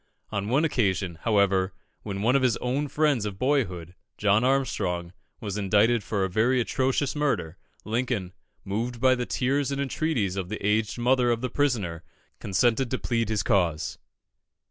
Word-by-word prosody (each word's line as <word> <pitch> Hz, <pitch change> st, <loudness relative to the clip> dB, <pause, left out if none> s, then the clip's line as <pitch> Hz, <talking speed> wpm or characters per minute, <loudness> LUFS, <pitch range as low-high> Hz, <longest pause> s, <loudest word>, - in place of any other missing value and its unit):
On 100 Hz, -1 st, -2 dB
one 140 Hz, +6 st, +3 dB
occasion, 95 Hz, -, 0 dB
however, 100 Hz, -3 st, +2 dB, 0.3 s
when 100 Hz, -1 st, -4 dB
one 125 Hz, +4 st, +3 dB
of 135 Hz, -, +4 dB
his 125 Hz, -3 st, +2 dB
own 135 Hz, +4 st, -1 dB
friends 145 Hz, -5 st, +1 dB
of 105 Hz, -2 st, -4 dB
boyhood, 95 Hz, -, -1 dB, 0.2 s
John 105 Hz, +2 st, +3 dB
Armstrong, 95 Hz, -10 st, 0 dB, 0.3 s
was 105 Hz, -1 st, -4 dB
indicted 105 Hz, +3 st, +3 dB
for 100 Hz, -1 st, -1 dB
a -, -, +1 dB
very 115 Hz, +7 st, +2 dB
atrocious 130 Hz, +3 st, 0 dB
murder, 140 Hz, -, -1 dB, 0.3 s
Lincoln, 110 Hz, -5 st, -2 dB, 0.3 s
moved 115 Hz, +5 st, -3 dB
by 130 Hz, +1 st, +5 dB
the 125 Hz, -1 st, -2 dB
tears 140 Hz, +2 st, 0 dB
and 140 Hz, -, -2 dB
entreaties 135 Hz, -, -1 dB
of 90 Hz, -2 st, -3 dB
the 110 Hz, -, -3 dB
aged 105 Hz, +2 st, +1 dB
mother 125 Hz, +1 st, +2 dB
of 115 Hz, -1 st, 0 dB
the 125 Hz, -2 st, -3 dB
prisoner, 110 Hz, -, 0 dB, 0.4 s
consented 120 Hz, +5 st, +1 dB
to 130 Hz, -, -1 dB
plead 115 Hz, -3 st, -1 dB
his 110 Hz, -2 st, 0 dB
cause. 85 Hz, -8 st, 0 dB
115 Hz, 165 wpm, -26 LUFS, 100-130 Hz, 0.4 s, by